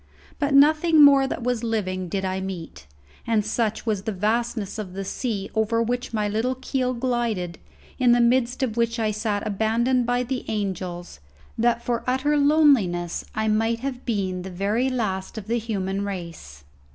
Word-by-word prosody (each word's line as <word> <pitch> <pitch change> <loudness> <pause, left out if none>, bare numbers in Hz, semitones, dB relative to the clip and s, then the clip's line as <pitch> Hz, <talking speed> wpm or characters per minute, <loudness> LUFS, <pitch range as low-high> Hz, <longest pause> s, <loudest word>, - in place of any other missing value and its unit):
But 285 -2 +1
nothing 310 +2 +6
more 275 -1 +7
that 255 - -4
was 245 -1 -1
living 185 -5 -2
did 190 +2 -2
I 190 0 -2
meet, 170 - -7 0.4
and 220 -3 +2
such 220 0 -1
was 215 -4 0
the 220 +2 -3
vastness 215 +1 -1
of 190 -4 -6
the 195 +1 -5
sea 205 -2 -3
over 220 +1 +1
which 245 +2 -1
my 215 -2 0
little 225 +5 -1
keel 255 0 -2
glided, 235 -8 -2 0.4
in 250 -2 +4
the 240 - +5
midst 245 +2 +2
of 235 -3 -2
which 230 0 +1
I 220 -2 0
sat 210 -1 -2
abandoned 230 +4 +1
by 245 0 +1
the 255 +1 -3
angels, 185 - -4 0.4
that 235 +1 +1
for 235 -1 -1
utter 265 +4 +1
loneliness 280 - +3
I 220 0 0
might 225 +2 +1
have 265 -2 -4
been 190 -6 -2
the 190 - -7
very 205 +8 0
last 210 -5 -3
of 215 - -6
the 235 +2 0
human 200 -3 -2
race. 170 - -7
225 Hz, 175 wpm, -24 LUFS, 195-245 Hz, 0.4 s, more